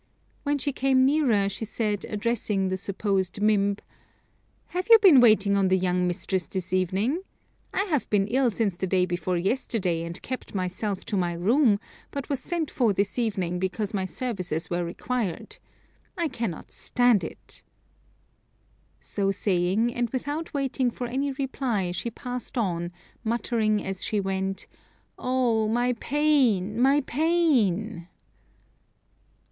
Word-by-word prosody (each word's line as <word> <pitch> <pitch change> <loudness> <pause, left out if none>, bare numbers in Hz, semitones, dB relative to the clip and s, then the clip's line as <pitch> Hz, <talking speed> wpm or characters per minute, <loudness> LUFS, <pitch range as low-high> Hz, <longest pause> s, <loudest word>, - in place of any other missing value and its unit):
When 290 0 0
she 285 0 -2
came 265 -1 +3
nearer 260 -9 +3
she 200 +3 -4
said, 210 -2 -2
addressing 210 -3 0
the 185 - -1
supposed 195 0 -1
Mimb, 205 -1 +2 0.9
"Have 360 +1 -3
you 455 - +11
been 380 -11 +7
waiting 210 -4 +5
on 195 -1 +3
the 190 0 +3
young 180 -1 +1
mistress 180 0 -2
this 185 -1 -4
evening? 195 - +1 0.5
I 390 - +1
have 315 -10 -1
been 200 -2 +3
ill 255 +3 +2
since 210 -4 -1
the 190 +2 -3
day 185 0 +2
before 175 0 -1
yesterday, 190 -3 0
and 170 0 -5
kept 255 -4 -6
myself 190 +2 -3
to 205 - -2
my 175 -2 0
room, 210 - +3 0.3
but 280 -1 -6
was 280 -3 -1
sent 340 -4 -3
for 235 -6 +2
this 200 +5 -1
evening 190 -6 -1
because 190 +3 -2
my 190 -2 -1
services 185 - -3
were 175 0 0
required. 195 +3 -3 0.6
I 335 -3 0
cannot 230 - -5
stand 245 -5 +2
it." - - -9 1.4
So 195 -1 -2
saying, 195 +3 +1
and 240 -1 -1
without 290 +6 -3
waiting 270 -2 0
for 245 +1 -5
any 270 +4 -1
reply, 255 -8 -1
she 210 +6 -3
passed 250 +1 -6
on, 175 -6 -1 0.3
muttering 220 -2 0
as 190 -1 -3
she 215 - 0
went, 190 0 -2 0.5
"Oh! 245 -4 +1
my 240 +3 +1
pain! 245 -7 +1
my 275 +3 +5
pain!" 240 - +1
215 Hz, 140 wpm, -26 LUFS, 190-255 Hz, 1.4 s, you